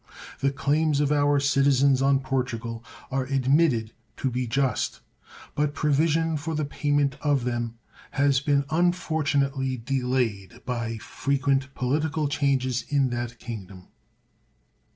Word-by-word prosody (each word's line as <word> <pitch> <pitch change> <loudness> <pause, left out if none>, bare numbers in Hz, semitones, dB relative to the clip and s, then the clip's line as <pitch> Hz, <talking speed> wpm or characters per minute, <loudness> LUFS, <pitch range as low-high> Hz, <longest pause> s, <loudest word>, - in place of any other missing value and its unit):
The 140 - +2
claims 150 +1 +1
of 145 0 +1
our 145 -1 +3
citizens 140 -1 +3
on 135 0 +3
Portugal 120 -3 -3 0.3
are 130 0 0
admitted 135 -3 +2 0.3
to 130 - -1
be 125 0 -2
just, 135 +3 0 0.5
but 150 0 0
provision 160 +2 +2
for 160 +2 -4
the 150 -1 0
payment 145 -1 0
of 145 -4 +1
them 120 -1 -2 0.3
has 140 -1 +2
been 140 0 +1
unfortunately 145 -6 +1
delayed 125 -4 -2
by 115 -3 -3
frequent 135 +3 -1
political 150 +4 0
changes 130 -4 0
in 140 -3 +2
that 120 -1 -4
Kingdom. 100 -6 -9
135 Hz, 120 wpm, -26 LUFS, 125-145 Hz, 0.5 s, our